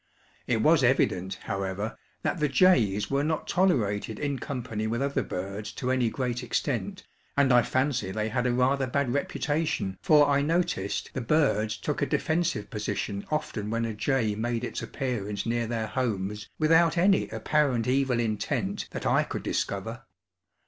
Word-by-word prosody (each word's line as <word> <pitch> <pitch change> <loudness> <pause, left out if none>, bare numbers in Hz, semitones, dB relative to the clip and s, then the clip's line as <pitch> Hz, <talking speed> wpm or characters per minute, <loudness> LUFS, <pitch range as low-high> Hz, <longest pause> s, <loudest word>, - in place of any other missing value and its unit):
It 115 -3 +1
was 155 -3 +5
evident, 95 -7 +2
however, 95 +3 -3 0.3
that 175 - -1
the 150 - +2
jays 120 - +3
were 140 +1 +2
not 155 +1 -1
tolerated 110 - +1
in 140 -2 -2
company 115 -5 -4
with 115 +2 -1
other 140 0 0
birds 100 +3 -5
to 130 0 -2
any 130 -3 +2
great 125 0 -2
extent, 125 - -2 0.3
and 135 -2 +4
I 120 - +7
fancy 130 -4 0
they 110 +3 -2
had 125 +2 0
a - - +2
rather 130 +2 +2
bad 130 -1 0
reputation, 145 - -1
for 150 -2 +5
I 140 0 +3
noticed 160 - -1
the 130 - -3
birds 115 -6 +2
took - - -3
a - - +2
defensive 160 -10 0
position 105 -2 -3
often 110 -9 -2
when 115 +1 0
a 115 - -3
jay 115 -1 0
made 115 +2 -2
its - - -4
appearance 105 -6 -3
near 115 0 0
their 115 -1 -2
homes 105 -4 -2
without 165 +2 +4
any 190 +3 +3
apparent 140 -7 +1
evil 130 -1 +2
intent, 110 -1 -1
that - - -6
I - - +4
could - - -4
discover. - - -2
125 Hz, 165 wpm, -27 LUFS, 105-140 Hz, 0.3 s, I